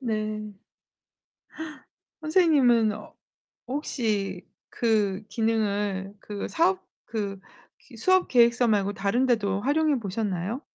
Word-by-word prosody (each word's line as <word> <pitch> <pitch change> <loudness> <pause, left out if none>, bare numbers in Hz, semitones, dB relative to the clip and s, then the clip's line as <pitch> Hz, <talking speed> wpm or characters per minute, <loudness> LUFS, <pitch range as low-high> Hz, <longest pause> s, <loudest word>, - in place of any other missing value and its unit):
네. 215 -3 -3 1.7
선생님은 280 - +4
어 210 0 -10 0.5
혹시 215 -9 -2 0.2
그 210 -4 +1
기능을 205 -3 -1
그 205 -1 -5
사업 370 +3 +1 0.2
그 200 -3 -4 0.5
그 - - -13
수업계획서 245 -11 +4
말고 205 -1 +1
다른 220 +7 +1
데도 205 -5 +1
활용해 290 +1 +2
보셨나요? 200 +2 -3
220 Hz, 195 characters per minute, -26 LUFS, 200-255 Hz, 1.7 s, 선생님은